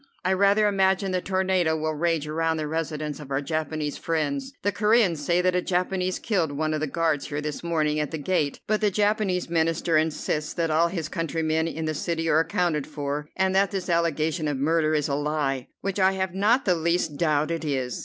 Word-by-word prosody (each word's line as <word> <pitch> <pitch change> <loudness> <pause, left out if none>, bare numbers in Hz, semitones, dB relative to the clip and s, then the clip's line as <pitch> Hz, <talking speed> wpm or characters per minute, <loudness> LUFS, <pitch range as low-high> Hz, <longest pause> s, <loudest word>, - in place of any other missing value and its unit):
I 190 - +3
rather 200 +2 +4
imagine 195 -1 +2
the 185 -1 0
tornado 185 -4 +1
will 155 0 -1
rage 160 -1 0
around 160 +1 0
the 155 - -2
residence 155 -1 -3
of 145 -3 -10
our 135 0 0
Japanese 155 0 -3
friends. 265 - -2
The 205 - +2
Coreans 210 -3 +3
say 175 +4 +2
that 180 0 +1
a 180 - +2
Japanese 185 0 -1
killed 180 -9 0
one 155 +2 -1
of 155 - -1
the 155 - -1
guards 160 -1 0
here 145 -1 -3
this 150 +1 -4
morning 155 -3 0
at 150 -2 -1
the 160 - -4
gate, 150 -2 -1
but 215 0 0
the 210 - +3
Japanese 205 -2 +1
Minister 165 0 +1
insists 155 -1 -1
that 165 -2 0
all 165 +2 +4
of - - -7
his 165 -5 -2
countrymen 160 0 -1
in 160 -1 -4
the 155 - -1
city 165 +2 -2
are 155 - +4
accounted 165 -3 0
for, 145 0 -4
and 190 0 +1
that 195 0 +3
this 185 -2 -3
allegation 160 -1 0
of 145 -2 -1
murder 155 +2 +2
is 150 -2 +1
a 140 - -2
lie, 145 -3 -1
which 195 +1 -2
I 190 0 +4
have 190 -1 -2
not 215 +7 +2
the 185 - +4
least 170 -2 0
doubt 155 -1 +1
it 165 -1 -2
is. 130 -5 -2
165 Hz, 215 wpm, -25 LUFS, 155-185 Hz, -, rather